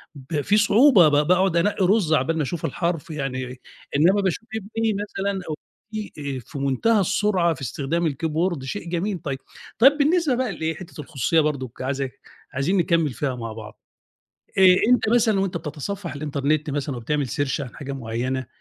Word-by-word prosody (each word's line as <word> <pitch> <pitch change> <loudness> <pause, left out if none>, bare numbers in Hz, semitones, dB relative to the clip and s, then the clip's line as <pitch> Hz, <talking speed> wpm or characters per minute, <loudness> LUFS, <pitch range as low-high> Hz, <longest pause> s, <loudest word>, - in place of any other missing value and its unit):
ب 145 +2 -3
في 205 +8 +2
صعوبة 215 - +6
ب - - +2 0.2
باقعُد 180 0 +3
أنقّي 190 +2 +2
رُز 190 -4 +3
عَبال 160 +1 +1
ما 155 - +1
أشوف 165 +3 -3
الحرف 170 +2 -2
يعني، 130 -4 -4 0.4
إنّما 180 +8 +4
باشوف 195 +4 -2
ابني 220 +1 -1
مثلًا 200 -1 -3
أو 155 - -2 0.4
بنتي 150 -10 -5
آآ - - -5
في 125 - -10
مُنتهى 140 - +2
السرعة 185 -2 +2
في 140 - -12
استخدام 145 +7 -2
الكيبورد 160 +1 -1
شيء 170 +6 -5
جميل 180 +3 -1
طيب، 140 -4 -4 0.4
طيب 270 +5 +7
بالنسبة 305 -1 +2
بقى 250 -2 -1
لإيه، 160 0 -2
حتّة 160 -3 -9
الخصوصية 150 +2 0
برضُك 140 -6 -2
عايز 135 +1 -1 0.5
عايزين 140 +9 +1
نكمّل 170 -4 +2
فيها 130 +2 -2
مع 115 -2 -6
بعض، 110 -1 -11 0.8
آآ 190 - +5 0.3
أنت 245 -2 +3
مثلًا 220 -3 +3
وأنت 190 -3 -1
بتتصفّح 170 +4 -5
الإنترنت 145 +1 -1
مثلًا 140 -1 -2
وبتعمل 140 +4 -1
search 145 +2 -1
عن 125 -5 -7
حاجة 140 -1 -6
معينة 130 +1 -3
160 Hz, 170 wpm, -23 LUFS, 140-195 Hz, 0.8 s, طيب